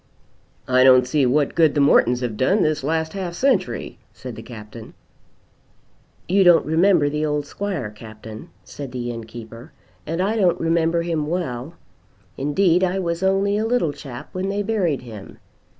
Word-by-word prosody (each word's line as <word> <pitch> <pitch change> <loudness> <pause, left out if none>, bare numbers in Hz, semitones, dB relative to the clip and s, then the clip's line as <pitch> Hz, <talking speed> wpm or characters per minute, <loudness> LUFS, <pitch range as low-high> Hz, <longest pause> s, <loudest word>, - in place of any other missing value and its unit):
"I 130 0 +4
don't 130 -1 +6
see 135 +1 +1
what 140 +3 +1
good 160 -3 +3
the - - +2
Mortons 125 -3 +4
have 120 -4 -3
done 185 - +2
this 155 -3 0
last 160 +2 -1
half 185 -3 -4
century," 230 - -1
said 120 +2 -9
the - - -8
Captain. 110 -1 -11 1.3
"You 195 +2 +3
don't 175 -2 +5
remember 165 0 +3
the 150 +1 -2
old 150 -1 -1
squire, 160 - -4
Captain," 110 0 -11
said 140 -3 -9
the 120 -1 -3
innkeeper, 115 0 -10 0.3
"and 165 +3 -3
I 205 +5 0
don't 185 -5 +2
remember 165 0 +1
him 160 -3 -2
well. 155 -3 -4 0.6
Indeed 170 +6 +2
I 185 +1 +1
was 170 -2 -2
only 195 +2 +1
a 220 - 0
little 225 -11 +1
chap 125 -5 -9
when 185 +1 -3
they 200 +1 -1
buried 190 - -1
him. 110 -5 -11
155 Hz, 165 wpm, -21 LUFS, 125-185 Hz, 1.3 s, don't